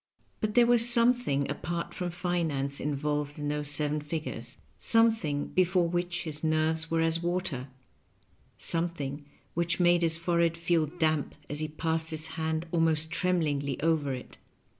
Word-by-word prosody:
But 210 -1 -2
there 240 -1 +6
was 240 0 +6
something 235 - +3
apart 170 +4 -4
from 180 -1 -3
finance 165 -6 -2
involved 145 0 -2
in 145 -1 -3
those 150 -1 -2
seven 150 0 +1
figures 155 +1 -5
— - - -37 0.2
^something 220 -11 +2
before 185 -1 +2
which 175 0 -2
his 155 -2 -4
nerves 160 +1 +1
were 165 0 +1
as 165 0 +1
water, 175 -7 -2 0.9
something 155 -4 -1 0.3
which 170 +1 0
made 175 -1 +4
his 165 -1 +3
forehead 170 0 +1
feel 165 -2 +1
damp 155 -2 -1 0.2
as 145 - -3
he 155 - -1
passed 160 +1 -1
his 160 0 0
hand 160 0 -2
almost 160 -1 +1
tremblingly 150 -7 0
over 160 -4 +1
it. 125 - -11
160 Hz, 150 wpm, -29 LUFS, 150-175 Hz, 0.9 s, there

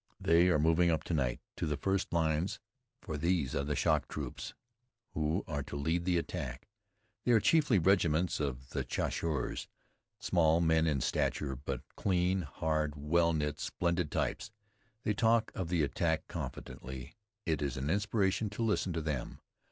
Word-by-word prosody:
They 85 +2 +4
are 85 - +4
moving 80 +3 +4
up 80 -2 +1
to 85 - -3
night 65 -6 0 0.2
to - - -1
the 75 -1 -1
first 95 +4 0
lines, 80 +1 +1 0.4
for 80 - -4
these 85 -5 +1
are 70 - 0
the 75 +1 -1
shock - - +2
troops - - -6 0.6
who 80 +4 0
are 75 -5 -2
to 70 - -7
lead 80 +5 0
the 90 -1 +2
attack. 70 -7 -4 0.6
They 120 - +3
are 115 - +6
chiefly 145 -2 +4
regiments 85 -2 +3
of 65 -3 -3 0.2
Chasseurs 75 -6 -2 0.5
small 80 -1 +3
men 80 -1 +3
in 70 -4 +1
stature, 70 +2 0
but 65 -1 -5
clean, 90 0 +1
hard, 75 -1 -1
well 85 +4 +2
knit 75 -2 -1
splendid 85 -2 -1
types. - - -2 0.5
They 105 - +1
talk 115 +2 +3
of 90 -3 -3
the 85 -3 +2
attack 80 +2 0
confidently. 65 -3 -7 0.3
It 80 -3 0
is 70 -4 -2
an 70 +4 -1
inspiration 100 +1 +1
to 105 +3 -3
listen 105 -5 +1
to 80 - -1
them. 75 -5 -3
80 Hz, 160 wpm, -32 LUFS, 75-90 Hz, 0.6 s, are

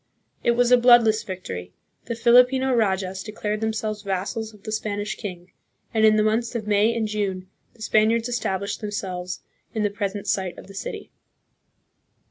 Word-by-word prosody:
It 235 - +3
was 245 +1 +2
a 250 - +7
bloodless 235 -3 +6
victory. 90 - -7 0.3
The 235 - -3
Filipino 250 +3 +5
rajas 190 -4 0
declared 210 +1 -4
themselves 220 -1 -2
vassals 200 +3 -3
of 210 -2 -19
the 215 - -5
Spanish 210 -1 -2
king, 180 -4 -8 0.4
and 220 -1 +2
in 215 - +5
the 215 - +3
months 225 +3 0
of 225 -3 -2
May 210 +2 +3
and 225 -2 0
June 195 -3 -2 0.3
the 220 - -10
Spaniards 225 +2 +3
established 215 -5 -2
themselves 185 -4 -4 0.3
in 215 - 0
the 205 - +1
present 200 -1 -3
site 190 -2 -1
of - - -10
the 195 - -13
city. 195 - -6
215 Hz, 165 wpm, -24 LUFS, 195-225 Hz, 0.4 s, a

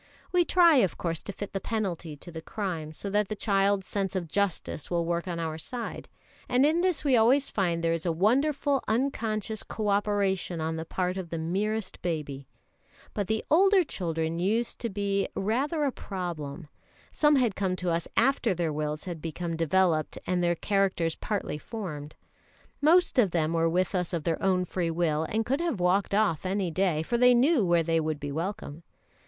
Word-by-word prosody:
We 360 -1 +4
try, 340 -3 +5
of 195 -8 +2
course, 165 -2 -2
to - - -6
fit 205 0 -7
the 195 - -1
penalty 180 -9 -3
to 175 - -10
the 160 -1 -7
crime, 170 -5 -4
so 155 - -5
that 210 0 +2
the 215 - -2
child's 200 -2 +1
sense 195 -1 -2
of 180 -3 -2
justice 195 -3 -2
will 170 -1 0
work 170 +1 -1
on 175 -2 -3
our 160 -1 -3
side; 240 +8 -6 0.4
and 255 +3 +4
in 320 +3 +3
this 360 -4 +1
we 275 -4 +3
always 255 +5 +4
find 170 -4 0
there 165 0 +2
is 165 +1 -3
a - - +2
wonderful 270 - +2
unconscious 220 -3 -1
co 215 -2 -3
operation 200 -3 0
on 160 0 -2
the 160 0 -4
part 180 +2 -2
of 185 -3 -5
the 165 - -3
merest 195 +5 -2
baby. 145 -5 -4 0.7
But 200 -3 -2
the 220 +1 -1
older 385 +3 +5
children 165 - -2
used 220 +6 0
to 235 - -2
be 200 -1 -1
rather 270 - 0
a 280 - +1
problem. 170 - -6 0.4
Some 295 -1 +4
had 240 -7 +2
come 190 -2 0
to 180 -1 -2
us 165 0 -1
after 255 -7 +3
their 165 -3 -1
wills 150 0 -3
had 175 -4 -6
become 165 +1 -4
developed 165 -1 +1
and 180 -1 0
their 175 0 +2
characters 190 -4 0
partly 200 -8 -3
formed. 155 -8 -7 0.7
Most 325 -1 +4
of 210 -6 +5
them 165 -2 0
were 165 0 +2
with 180 +4 0
us 180 -1 -1
of 165 -3 -1
their 165 0 -1
own 185 -1 +2
free 175 -1 -2
will, 160 -2 0
and 220 +6 -1
could 270 +5 0
have 330 - -1
walked 190 +3 +2
off 205 -7 +2
any 190 -1 -1
day, 170 -3 +1
for 235 +8 -1
they 250 0 +6
knew 265 +1 +4
where 170 -2 +3
they 165 0 +1
would 155 -2 -2
be 145 0 -5
welcome. 165 -1 -4
185 Hz, 195 wpm, -28 LUFS, 165-220 Hz, 0.7 s, they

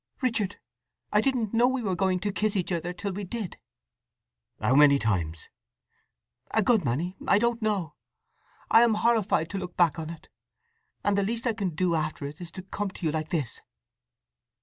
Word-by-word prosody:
"Richard, 220 -6 0 0.5
I 210 - +5
didn't 235 -4 0
know 235 +2 +5
we 260 -1 -1
were 195 -3 0
going 185 -1 +1
to 205 - -1
kiss 210 +1 0
each 185 -1 -1
other 175 0 -1
till 200 +3 -4
we 200 +2 -5
did!" 200 -1 -5 1.0
"How 125 - +2
many 140 0 +7
times?" 85 - -1 1.0
"A 220 - +2
good 220 -2 +3
many. 155 +9 -1
I - - +5
don't 235 +2 +1
know. 200 -7 -1 0.8
I 225 - +8
am 235 -2 +4
horrified 215 -8 +2
to 200 - -2
look 180 -1 -7
back 170 -2 +3
on 160 -1 -5
it, 165 -1 -10 0.8
and 205 - +2
the 200 - +2
least 230 +4 -2
I 235 - +2
can 195 -7 -3
do 180 +1 +1
after 155 -3 -2
it 145 +4 -8
is 175 - -6
to 185 - -7
come 200 +1 -3
to 185 - -8
you 155 - +2
like 155 0 -3
this." 150 -9 -2
190 Hz, 190 wpm, -27 LUFS, 160-215 Hz, 1.0 s, I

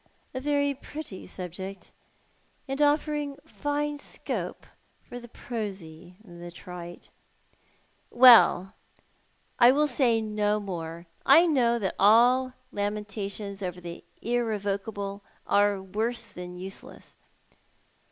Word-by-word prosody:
A 260 - -3
very 285 0 +1
pretty 280 -6 -8
subject, 190 +1 -7 0.8
and 270 +2 -2
offering 295 -1 +1
fine 290 0 -2
scope - - -5 0.4
for 245 - -9
the 240 - -12
prosy 190 -8 -7
and 175 -5 -13
the 175 - -7
trite." 175 0 -10 1.0
"Well, 235 -7 +7 0.9
I 240 0 +8
will 295 +3 +3
say 245 -4 +2
no 210 -1 0
more. 170 -4 -6 0.2
I 320 +6 +7
know 245 -7 +3
that 200 -5 -2
all 245 +5 +5 0.2
lamentations 205 -1 -4
over 180 -2 -4
the 170 -1 -8 0.2
irrevocable 205 -3 -2 0.2
are 205 0 +3
w 190 -1 -10 0.2
orso 235 -1 -6
than 180 0 -8
useless. 190 +2 -10
210 Hz, 110 wpm, -27 LUFS, 190-255 Hz, 1.0 s, I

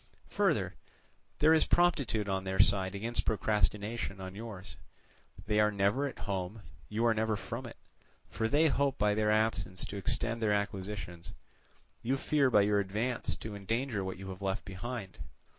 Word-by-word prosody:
Further, - - +1 0.6
there 155 +2 +5
is 160 - +4
promptitude 140 -12 +2
on 95 -1 -1
their 95 0 -2
side 95 -1 +3
against 115 +4 -1
procrastination 105 0 0
on 95 0 -6
yours; 100 -4 -8 0.7
they 105 +1 +2
are 105 0 +4
never 100 +8 +1
at 135 - -7
home, 100 +1 -3 0.3
you 110 +2 0
are 115 - +5
never 110 0 0
from 105 - -5
it: - - -11 0.5
for 110 - -1
they 150 +7 +4
hope 140 -2 +1
by 105 0 +3
their 105 0 +1
absence 100 -5 +1
to 100 - -6
extend 115 +4 -1
their 105 -2 +3
acquisitions, 100 -4 -4 0.7
you 130 +3 0
fear 140 0 +2
by 105 -4 +5
your 105 0 +3
advance 110 +5 -1
to 110 -2 -7
endanger 115 +2 -1
what 95 -1 -4
you 95 +1 -7
have 95 +1 -9
left 95 +1 -2
behind. 100 +1 -6
105 Hz, 165 wpm, -32 LUFS, 95-115 Hz, 0.7 s, there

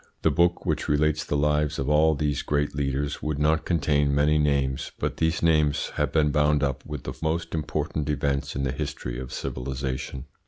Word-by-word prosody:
The - - +4
book 85 0 +2
which - - -1
relates 75 +1 +2
the 75 - -1
lives 75 +1 +1
of 70 - -2
all 75 +1 +4
these 75 0 -1
great 75 0 0
leaders 70 0 -2
would 75 -1 -2
not 80 +2 +2
contain 75 -4 +2
many 75 +1 +3
names, 70 -3 0
but - - -2
these 80 +1 0
names 75 -3 +2
have - - 0
been 75 -2 +3
bound 75 0 +2
up 70 -1 -1
with 75 -4 -6
the - - -5
most 80 +1 -1
important 75 -1 -2
events 70 -1 -1
in 70 - -1
the 65 - 0
history 65 -4 -4
of 65 -1 -7
civilisation. 65 +1 -4
75 Hz, 190 wpm, -26 LUFS, 70-75 Hz, -, The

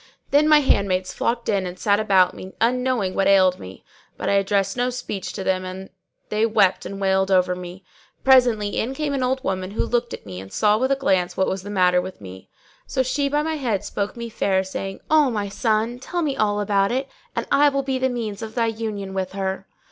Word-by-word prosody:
Then 295 +2 +4
my 305 -1 +7
handmaids 190 -8 +1
flocked 235 0 -1
in 195 -3 0
and 180 +1 -7
sat 205 +2 +2
about 190 -4 +3
me, 190 - -10
unknowing 245 -4 +1
what 195 - +1
ailed 185 -2 +4
me; 95 +1 -11 0.3
but - - -2
I - - +2
addressed 195 0 +1
no 245 0 0
speech 245 -6 -5
to 190 - -5
them, 185 -1 0
and 185 +1 -8 0.4
they 215 +1 0
wept 210 -4 +2
and 195 - -7
wailed 190 0 +1
over 180 -1 +3
me. 180 +1 -9 0.4
Presently 245 -6 +4
in 260 +4 -2
came 295 0 -2
an 275 - -1
old 260 +1 0
woman 185 -4 -2
who 205 - -2
looked 240 0 -1
at - - -8
me 95 -2 -7
and 95 0 -12
saw 210 -1 +3
with 260 +2 +1
a - - +4
glance 185 -10 0
what 190 - +3
was 190 0 -2
the 200 - -9
matter 180 -3 +3
with 185 +1 -8
me: 95 -1 -11 0.4
so 260 - 0
she 280 +3 -1
sat 280 - -6
down 295 0 +2
by 320 - -1
my - - -1
head 245 -7 0
and 195 - -4
spoke 205 +3 -4
me 235 0 -5
fair, 195 -4 0
saying, 195 0 -6
"O 305 -3 +5
my 205 -4 -2
son, 220 +3 0
tell 345 +6 -3
me 285 -3 -1
all 210 -3 +1
about 200 0 +1
it 265 +2 -1 0.3
and - - -2
I 290 +1 +5
will 275 -1 -1
be 265 -1 -1
the 260 0 +1
means 225 -4 -4
of 220 0 -7
thy 235 - +2
union 215 -3 -4
with 190 -1 -3
her." 190 0 -3
205 Hz, 240 wpm, -22 LUFS, 190-250 Hz, 0.4 s, my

